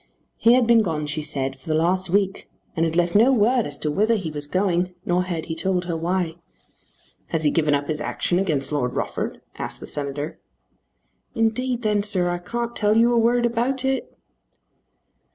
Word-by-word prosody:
He 230 Hz, -, +5 dB
had 250 Hz, -1 st, +4 dB
been 230 Hz, -1 st, +5 dB
gone, 160 Hz, -7 st, -2 dB
she 150 Hz, +1 st, -3 dB
said, 135 Hz, -3 st, -3 dB
for 130 Hz, -, -12 dB
the 155 Hz, -, +2 dB
last 180 Hz, +3 st, +1 dB
week, 195 Hz, +1 st, 0 dB, 0.3 s
and 165 Hz, -, +2 dB
had 165 Hz, 0 st, -1 dB
left 175 Hz, 0 st, +2 dB
no 230 Hz, +6 st, +6 dB
word 240 Hz, 0 st, +3 dB
as 145 Hz, -, -5 dB
to 150 Hz, -, -2 dB
whither 215 Hz, +8 st, +2 dB
he 185 Hz, -7 st, -3 dB
was 145 Hz, -1 st, -6 dB
going; 180 Hz, 0 st, 0 dB
nor 180 Hz, +1 st, +1 dB
had 170 Hz, -3 st, -3 dB
he 160 Hz, -, -4 dB
told 180 Hz, +2 st, -1 dB
her 170 Hz, -1 st, -2 dB
why. 170 Hz, 0 st, -1 dB, 0.9 s
"Has 165 Hz, -1 st, -2 dB
he 150 Hz, -, +3 dB
given 150 Hz, -3 st, +2 dB
up 145 Hz, 0 st, -2 dB
his 155 Hz, -1 st, -2 dB
action 175 Hz, -, 0 dB
against 150 Hz, -8 st, -1 dB
Lord 125 Hz, -4 st, -1 dB
Rufford?" -, -, -3 dB, 0.2 s
asked -, -, -5 dB
the -, -, -8 dB
Senator. 145 Hz, +1 st, -5 dB, 1.0 s
"Indeed 240 Hz, +2 st, 0 dB
then, 210 Hz, -1 st, +2 dB
sir, 185 Hz, -4 st, 0 dB
I 175 Hz, -, -2 dB
can't 235 Hz, +6 st, -4 dB
tell 210 Hz, 0 st, +2 dB
you 235 Hz, +1 st, +5 dB
a 235 Hz, -, +4 dB
word 240 Hz, +1 st, +3 dB
about 250 Hz, +3 st, 0 dB
it." 265 Hz, 0 st, -2 dB
180 Hz, 195 wpm, -23 LUFS, 155-225 Hz, 1.0 s, no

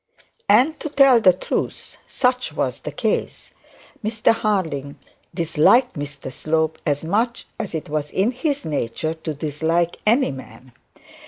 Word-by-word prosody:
And 305 Hz, +5 st, +4 dB
to 310 Hz, -, -4 dB
tell 275 Hz, -4 st, +5 dB
the 185 Hz, -, +7 dB
truth, 180 Hz, -, -4 dB
such 250 Hz, -1 st, 0 dB
was -, -, -2 dB
the -, -, -6 dB
case. -, -, -2 dB, 0.5 s
Mr 215 Hz, +1 st, +2 dB
Harding 160 Hz, -11 st, -2 dB, 0.3 s
disliked 170 Hz, -, +3 dB
Mr 145 Hz, -3 st, -7 dB
Slope 160 Hz, 0 st, -1 dB
as 145 Hz, 0 st, 0 dB
much 230 Hz, +7 st, 0 dB
as 205 Hz, -7 st, -4 dB
it 160 Hz, -, -4 dB
was 150 Hz, 0 st, -2 dB
in 195 Hz, +9 st, +1 dB
his 280 Hz, +3 st, -2 dB
nature 155 Hz, +1 st, -2 dB
to 160 Hz, -1 st, -6 dB
dislike 160 Hz, +4 st, -1 dB
any 245 Hz, +5 st, +4 dB
man. 130 Hz, -1 st, -11 dB
165 Hz, 140 wpm, -22 LUFS, 150-235 Hz, 0.5 s, the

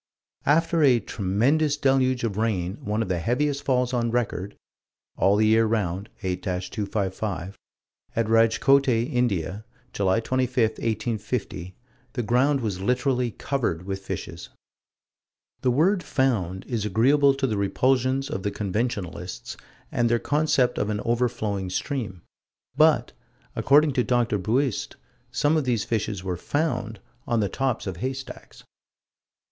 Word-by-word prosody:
After 165 Hz, +3 st, +3 dB
a 130 Hz, -5 st, +5 dB
"tremendous 120 Hz, +11 st, +1 dB
deluge 130 Hz, -3 st, +2 dB
of 110 Hz, -4 st, -1 dB
rain, 100 Hz, -4 st, -1 dB
one 105 Hz, +2 st, 0 dB
of -, -, -6 dB
the 90 Hz, -2 st, -1 dB
heaviest 140 Hz, -, 0 dB
falls 125 Hz, -1 st, +1 dB
on 120 Hz, -1 st, +1 dB
record" 110 Hz, -5 st, -2 dB, 0.6 s
(All 100 Hz, +1 st, +3 dB
the 110 Hz, +1 st, +3 dB
Year 110 Hz, +1 st, +4 dB
Round, 100 Hz, -2 st, -1 dB
8 90 Hz, -1 st, -2 dB
255) 95 Hz, +1 st, -3 dB, 0.6 s
at 115 Hz, -, +1 dB
Rajkote, 115 Hz, +5 st, +4 dB
India, 115 Hz, -, 0 dB, 0.3 s
July 100 Hz, +2 st, +2 dB
25, 130 Hz, +2 st, -1 dB
1850, 110 Hz, -5 st, -3 dB, 0.4 s
"the 120 Hz, -, -2 dB
ground 130 Hz, +5 st, +2 dB
was 105 Hz, -5 st, -2 dB
found 95 Hz, -, -5 dB
literally 125 Hz, 0 st, +1 dB
covered 110 Hz, -, -2 dB
with 95 Hz, 0 st, -4 dB
fishes." -, -, -6 dB, 1.1 s
The 130 Hz, -, +2 dB
word 175 Hz, +10 st, +3 dB
"found" 105 Hz, -, 0 dB
is 115 Hz, -5 st, -2 dB
agreeable 135 Hz, +7 st, +4 dB
to 135 Hz, 0 st, -1 dB
the 110 Hz, -5 st, -1 dB
repulsions 130 Hz, +6 st, +1 dB
of 95 Hz, -, -4 dB
the 105 Hz, -, -1 dB
conventionalists 100 Hz, -4 st, -3 dB, 0.4 s
and 120 Hz, -1 st, +1 dB
their 120 Hz, -, +3 dB
concept 145 Hz, -1 st, +1 dB
of 105 Hz, -, 0 dB
an 105 Hz, -1 st, -1 dB
overflowing 110 Hz, -5 st, -1 dB
stream 105 Hz, -, -3 dB, 0.5 s
but, -, -, +4 dB, 0.4 s
according 145 Hz, +1 st, +4 dB
to 125 Hz, -2 st, +2 dB
Dr. 120 Hz, -4 st, +1 dB
Buist, 120 Hz, +6 st, -1 dB, 0.3 s
some 150 Hz, +2 st, +1 dB
of 155 Hz, -3 st, +1 dB
these 120 Hz, -4 st, +1 dB
fishes 105 Hz, -4 st, -2 dB
were 90 Hz, -2 st, -3 dB
"found" 125 Hz, -, -2 dB, 0.3 s
on 120 Hz, -2 st, +1 dB
the 105 Hz, -, +1 dB
tops 135 Hz, -3 st, -1 dB
of 95 Hz, -4 st, -4 dB
haystacks. 130 Hz, +3 st, -6 dB
115 Hz, 135 wpm, -25 LUFS, 100-130 Hz, 1.1 s, a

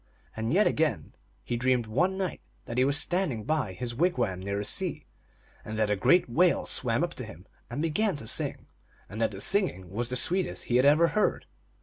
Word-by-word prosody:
And 110 Hz, +1 st, -3 dB
yet 200 Hz, +7 st, +4 dB
again 140 Hz, -, 0 dB, 0.3 s
he 120 Hz, -, -3 dB
dreamed 125 Hz, 0 st, +1 dB
one 180 Hz, +13 st, 0 dB
night 190 Hz, -3 st, -3 dB, 0.2 s
that 120 Hz, +1 st, -3 dB
he -, -, +4 dB
was 140 Hz, +2 st, +3 dB
standing 160 Hz, -, -1 dB
by 140 Hz, -7 st, -1 dB
his 120 Hz, +6 st, -4 dB
wigwam 120 Hz, -, 0 dB
near 100 Hz, +1 st, -4 dB
the 100 Hz, -, -3 dB
sea, -, -, -2 dB, 0.6 s
and 110 Hz, -, -6 dB
that 105 Hz, -1 st, +1 dB
a -, -, +2 dB
great 175 Hz, -, +3 dB
whale 170 Hz, +9 st, +2 dB
swam -, -, +1 dB
up -, -, -2 dB
to -, -, -6 dB
him -, -, -11 dB, 0.2 s
and 150 Hz, -, -3 dB
began 190 Hz, +5 st, 0 dB
to 145 Hz, -, -6 dB
sing, -, -, +1 dB, 0.4 s
and 110 Hz, +3 st, -7 dB
that 115 Hz, -, +2 dB
the 95 Hz, -, -9 dB
singing 105 Hz, -, +1 dB
was 115 Hz, +4 st, -2 dB
the 125 Hz, -, -2 dB
sweetest 180 Hz, +8 st, +2 dB
he 120 Hz, -, +1 dB
had 130 Hz, -, +3 dB
ever 155 Hz, +4 st, +5 dB
heard. 215 Hz, -, 0 dB
125 Hz, 210 wpm, -28 LUFS, 110-170 Hz, 0.6 s, ever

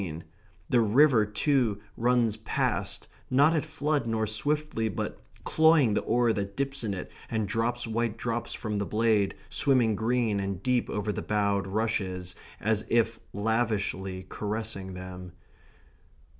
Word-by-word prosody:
And 80 Hz, -2 st, -6 dB, 0.4 s
the 120 Hz, -, +3 dB
river 115 Hz, 0 st, +5 dB
too 115 Hz, -1 st, +1 dB, 0.2 s
runs 120 Hz, -2 st, +2 dB
past, -, -, -2 dB, 0.2 s
not 145 Hz, +5 st, +5 dB
at 155 Hz, -, +1 dB
flood, 150 Hz, -3 st, -1 dB
nor 110 Hz, -1 st, 0 dB
swiftly, 130 Hz, +1 st, 0 dB
but 95 Hz, -, -4 dB, 0.2 s
cloying 160 Hz, -8 st, +4 dB
the 105 Hz, -, +1 dB
oar 120 Hz, 0 st, +2 dB
that 100 Hz, -1 st, -4 dB
dips 135 Hz, -2 st, -1 dB
in 100 Hz, -3 st, -1 dB
it 90 Hz, -, -7 dB, 0.2 s
and 110 Hz, -3 st, -1 dB
drops 120 Hz, +3 st, -1 dB
white 115 Hz, 0 st, -1 dB
drops 115 Hz, 0 st, -3 dB
from 105 Hz, -2 st, -3 dB
the 100 Hz, -, -1 dB
blade, 110 Hz, -2 st, +2 dB
swimming 125 Hz, -6 st, +2 dB
green 110 Hz, -1 st, +1 dB
and 95 Hz, -1 st, -3 dB
deep 125 Hz, -1 st, +1 dB
over 105 Hz, 0 st, -1 dB
the 100 Hz, -, -4 dB
bowed 100 Hz, -2 st, 0 dB
rushes, 95 Hz, -4 st, -2 dB, 0.3 s
as 110 Hz, 0 st, +1 dB
if 115 Hz, -1 st, +2 dB
lavishly 100 Hz, -4 st, -1 dB
caressing 105 Hz, -3 st, -4 dB
them. 90 Hz, -1 st, -8 dB
110 Hz, 145 wpm, -28 LUFS, 100-120 Hz, 0.4 s, river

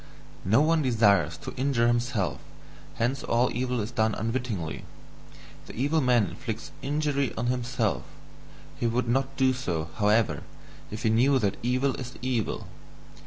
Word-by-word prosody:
"No 110 Hz, +9 st, +4 dB
one 160 Hz, +1 st, +3 dB
desires 100 Hz, -, +3 dB
to -, -, -7 dB
injure 130 Hz, -3 st, +2 dB
himself, 120 Hz, -, 0 dB, 0.5 s
hence 125 Hz, +4 st, 0 dB
all 120 Hz, +2 st, +1 dB
evil 125 Hz, 0 st, -1 dB
is 105 Hz, +3 st, -4 dB
done 110 Hz, -3 st, +1 dB
unwittingly. 115 Hz, -8 st, -3 dB, 0.8 s
The -, -, -9 dB
evil 145 Hz, +6 st, +1 dB
man 125 Hz, -5 st, +4 dB
inflicts 115 Hz, +5 st, -6 dB
injury 140 Hz, -3 st, 0 dB
on 115 Hz, -, -1 dB
himself; 125 Hz, -3 st, -1 dB, 0.8 s
he 120 Hz, -, +1 dB
would 120 Hz, +1 st, 0 dB
not 135 Hz, +3 st, 0 dB
do 130 Hz, -1 st, +4 dB
so, 85 Hz, -11 st, -3 dB
however, 105 Hz, +1 st, +2 dB, 0.5 s
if 105 Hz, +3 st, -6 dB
he 110 Hz, -, +3 dB
knew 130 Hz, +5 st, +4 dB
that 100 Hz, -6 st, 0 dB
evil 130 Hz, +3 st, +1 dB
is 125 Hz, 0 st, -7 dB
evil. 125 Hz, -4 st, -1 dB
120 Hz, 145 wpm, -27 LUFS, 110-130 Hz, 0.8 s, No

